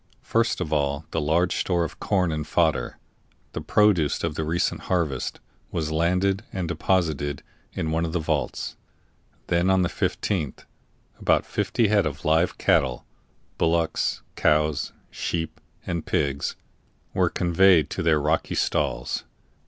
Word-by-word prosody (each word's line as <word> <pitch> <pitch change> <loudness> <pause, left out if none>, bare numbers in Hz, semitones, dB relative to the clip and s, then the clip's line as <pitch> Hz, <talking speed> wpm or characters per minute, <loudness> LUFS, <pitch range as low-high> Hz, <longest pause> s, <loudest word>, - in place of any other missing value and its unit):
First 115 -1 +1
of 80 -4 -2
all, 70 +1 0
the 80 - 0
large 85 +4 +2
store 85 -2 +1
of 80 - -6
corn 90 -4 +1
and 75 -1 -3
fodder, 80 -1 +1 0.5
the - - -5
produce 100 -9 +3
of 85 -2 0
the 80 - -2
recent 85 +3 0
harvest, 80 -8 -1 0.3
was 80 -2 -2
landed 90 +5 +1
and 90 -3 -3
deposited 80 -5 0 0.3
in 80 - -2
one 80 +1 +1
of 80 - -2
the 90 - 0
vaults; 80 - -2 0.7
then, 85 +2 +2
on 95 -1 +4
the 85 - +1
15th, 80 -10 -2 0.5
about - - +2
fifty 115 -4 0
head 100 -5 +3
of 75 +3 -6
live 80 +3 +2
cattle 65 -2 +2 0.5
bullocks, 85 0 +1
cows, 75 -1 +2 0.2
sheep, 80 -2 -3 0.2
and 85 -2 -3
pigs 70 -1 0 0.6
were - - +2
conveyed 85 -2 +4
to - - -2
their 80 -2 +3
rocky 75 +2 0
stalls. 65 0 0
80 Hz, 140 wpm, -25 LUFS, 75-90 Hz, 0.7 s, on